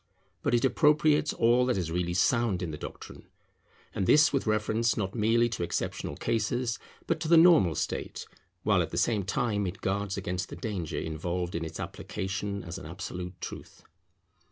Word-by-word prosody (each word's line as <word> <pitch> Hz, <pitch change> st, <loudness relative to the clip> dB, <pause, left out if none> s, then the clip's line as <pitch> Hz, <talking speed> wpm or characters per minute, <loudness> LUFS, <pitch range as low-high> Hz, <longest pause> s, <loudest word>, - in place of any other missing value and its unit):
But -, -, +1 dB
it 120 Hz, -, +2 dB
appropriates 150 Hz, +2 st, +3 dB
all 120 Hz, +2 st, +3 dB
that 125 Hz, -, +1 dB
is 85 Hz, -4 st, -2 dB
really 85 Hz, 0 st, -1 dB
sound 105 Hz, -2 st, +2 dB
in 85 Hz, -, -3 dB
the 75 Hz, -, -6 dB
doctrine, -, -, -9 dB, 0.7 s
and 95 Hz, -, -1 dB
this 150 Hz, 0 st, +6 dB
with 135 Hz, -4 st, 0 dB
reference 110 Hz, +2 st, +1 dB
not 95 Hz, -2 st, -2 dB
merely 115 Hz, +1 st, +3 dB
to 110 Hz, -, -4 dB
exceptional 85 Hz, -, -3 dB
cases 115 Hz, +2 st, -1 dB, 0.3 s
but 165 Hz, -1 st, 0 dB
to 160 Hz, -, -3 dB
the 170 Hz, +1 st, +6 dB
normal 160 Hz, -, +6 dB
state; -, -, -3 dB, 0.4 s
while -, -, +3 dB
at -, -, -2 dB
the -, -, -5 dB
same 110 Hz, -4 st, +2 dB
time 105 Hz, 0 st, -1 dB
it 90 Hz, +3 st, -6 dB
guards 100 Hz, 0 st, -1 dB
against 90 Hz, -1 st, -3 dB
the -, -, -7 dB
danger 90 Hz, -7 st, -4 dB
involved 85 Hz, +3 st, -3 dB
in 85 Hz, -, -2 dB
its 80 Hz, -, -6 dB
application 100 Hz, 0 st, -4 dB
as 85 Hz, +3 st, -6 dB
an 90 Hz, -, -9 dB
absolute 90 Hz, +1 st, -6 dB
truth. -, -, -8 dB
100 Hz, 180 wpm, -29 LUFS, 90-120 Hz, 0.7 s, this